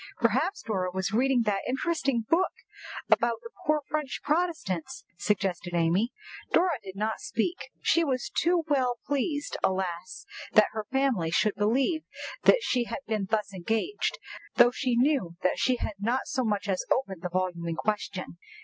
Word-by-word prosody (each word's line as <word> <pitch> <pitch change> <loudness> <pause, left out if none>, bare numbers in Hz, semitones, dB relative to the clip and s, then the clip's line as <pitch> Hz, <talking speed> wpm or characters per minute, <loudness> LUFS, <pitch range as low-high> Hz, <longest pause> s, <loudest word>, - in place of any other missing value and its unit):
"Perhaps 395 +2 +1
Dora 190 -5 -1
was 190 +1 -2
reading 250 +2 +3
that 205 -2 0
interesting 270 -3 0
book 365 +3 +3 0.6
about 235 -1 +4
the 465 - -9 0.2
poor 305 0 +3
French 300 -3 -3
Protestants," 300 - -1
suggested 180 -2 -1
Amy. 175 +8 +2 0.4
Dora 340 -6 +3
did 190 -1 -8
not 215 +2 -1
speak. 285 +11 -2
She 335 - +4
was 260 -5 -1
too 340 0 +3
well 255 -5 +1
pleased, 285 +1 -1
alas! 185 - -2 0.3
that 215 -1 +6
her 215 -1 -5
family 265 -11 +1
should 205 +5 +2
believe 265 - +1 0.4
that - - +6
she 245 -2 +1
had 275 - -6
been 215 -3 -1
thus 210 -2 0
engaged, 225 - -1 0.4
though 240 0 +7
she 250 -1 0
knew 245 - +2
that 185 - +2
she 255 - +3
had 220 - -3
not 240 +6 0
so 260 -3 -1
much 210 -3 -1
as 190 -2 0
opened 195 -10 0
the 180 - -3
volume 180 -1 -2
in 165 - -1
question. 190 -3 -3
230 Hz, 160 wpm, -28 LUFS, 190-275 Hz, 0.6 s, though